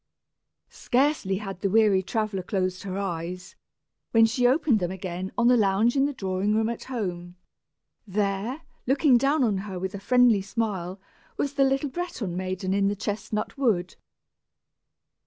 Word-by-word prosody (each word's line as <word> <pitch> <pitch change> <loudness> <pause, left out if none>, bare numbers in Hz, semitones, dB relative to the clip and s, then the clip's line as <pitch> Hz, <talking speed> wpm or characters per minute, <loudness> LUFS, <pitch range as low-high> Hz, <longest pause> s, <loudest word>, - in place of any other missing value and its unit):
Scarcely 250 -7 +1
had 195 -2 -7
the 195 - +1
weary 210 -2 +4
traveller 215 -1 -2
closed 185 -1 -2
her 195 -1 -5
eyes, 180 -1 -4 0.6
when 225 -1 +7
she 245 +2 +2
opened 260 -3 +3
them 175 -2 -1
again 185 0 -5
on 240 0 +3
the 250 - +6
lounge 215 +2 +2
in 275 0 +3
the - - -2
drawing 195 -1 -1
room 220 +1 +1
at 235 - -5
home! 180 -8 -4 0.7
There, 205 - -2 0.2
looking 270 -1 +4
down 275 +2 +2
on 210 -5 +1
her 195 -1 -6
with 190 +2 -4
a 200 - -5
friendly 240 0 +4
smile, 195 -3 -3 0.4
was 285 - -1
the 280 -1 +3
little 270 +1 0
Breton 255 - -4
maiden 185 +1 -2
in 200 0 +2
the 205 - 0
chestnut 215 +4 -4
wood. 195 -9 +1
205 Hz, 155 wpm, -26 LUFS, 190-245 Hz, 0.7 s, when